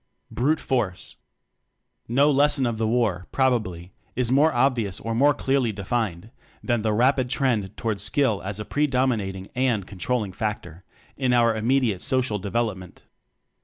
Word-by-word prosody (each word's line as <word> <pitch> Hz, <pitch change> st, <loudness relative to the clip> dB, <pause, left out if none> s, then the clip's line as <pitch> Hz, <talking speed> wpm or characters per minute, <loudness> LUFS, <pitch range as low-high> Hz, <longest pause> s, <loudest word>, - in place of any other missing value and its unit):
Brute 150 Hz, +6 st, +1 dB
Force. 110 Hz, -9 st, -2 dB, 0.9 s
No 140 Hz, +5 st, +3 dB
lesson 145 Hz, -1 st, +2 dB
of 115 Hz, -2 st, -2 dB
the 110 Hz, -, +1 dB
war, 110 Hz, -6 st, 0 dB
probably, 110 Hz, -10 st, 0 dB, 0.2 s
is 125 Hz, -1 st, 0 dB
more 145 Hz, +4 st, +4 dB
obvious 120 Hz, -6 st, 0 dB
or 115 Hz, -, -4 dB
more 140 Hz, +5 st, +4 dB
clearly 135 Hz, -4 st, 0 dB
de 100 Hz, -1 st, -8 dB
fined 110 Hz, -3 st, -2 dB, 0.3 s
than 120 Hz, -3 st, 0 dB
the 110 Hz, 0 st, 0 dB
rapid 125 Hz, +3 st, +2 dB
trend 120 Hz, -7 st, -1 dB
toward 110 Hz, -3 st, -2 dB
Skill 105 Hz, +1 st, +1 dB
as 100 Hz, +1 st, -5 dB
a 105 Hz, -, -5 dB
predominating 125 Hz, -10 st, -1 dB
and 125 Hz, -6 st, 0 dB
con 95 Hz, -1 st, -12 dB
trolling 110 Hz, -3 st, -1 dB
factor 95 Hz, -5 st, -5 dB, 0.3 s
in 130 Hz, -2 st, +1 dB
our 115 Hz, -2 st, +3 dB
immediate 115 Hz, -3 st, +1 dB
so 130 Hz, -2 st, +1 dB
cial 110 Hz, -6 st, -2 dB
development. 100 Hz, -3 st, -3 dB
115 Hz, 155 wpm, -24 LUFS, 100-130 Hz, 0.9 s, more